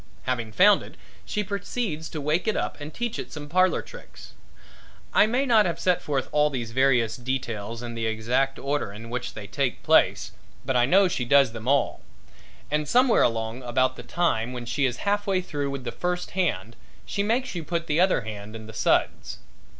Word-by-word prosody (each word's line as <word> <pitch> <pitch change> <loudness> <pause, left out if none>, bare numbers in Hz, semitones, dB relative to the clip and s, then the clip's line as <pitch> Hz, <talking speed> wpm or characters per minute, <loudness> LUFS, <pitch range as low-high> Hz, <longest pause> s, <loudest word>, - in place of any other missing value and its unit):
Having 120 -4 -2
found 200 - +6
it - - -12 0.3
she 210 - -2
proceeds 200 -4 -3
to 155 - -5
wake 155 +7 0
it 220 - +1
up - - -3
and 145 +1 -6
teach 240 +3 -3
it - - -6
some 150 -1 -7
parlor 185 +4 +2
tricks. - - -13 0.8
I 210 - +6
may 250 +5 +1
not 220 -6 +4
have 170 -1 -3
set 180 -2 +2
forth 140 -3 -2
all 150 0 +3
these 120 -5 -4
various 125 -3 +2
details 115 -3 -4
in 120 -1 -5
the 115 -1 -2
exact 120 +5 0
order 140 -6 -2
in 115 +3 -10
which 125 0 -4
they - - -7
take - - -2
place, - - +3 0.3
but 130 - -1
I 120 0 +4
know 195 +5 +5
she 150 -8 -2
does 135 0 +4
them 115 0 -8
all. 140 +1 +1 0.7
And 150 0 0
somewhere 250 - +4
along 115 +1 0
about 130 +1 +1
the - - -8
time 125 -9 -1
when 120 -1 -6
she 135 +3 +1
is 125 -1 -4
half 205 0 0
way 190 -2 +2
through 145 -6 -3
with 140 -2 -5
the 120 - -4
first 180 +8 -3
hand 120 - -1 0.3
she 200 - -2
makes 240 +5 0
you 170 -3 -4
put 170 +1 -2
the 155 0 0
other 185 -7 +3
hand 105 -1 -8
in 110 -1 -8
the 110 - -10
suds. - - 0
140 Hz, 205 wpm, -25 LUFS, 120-180 Hz, 0.8 s, found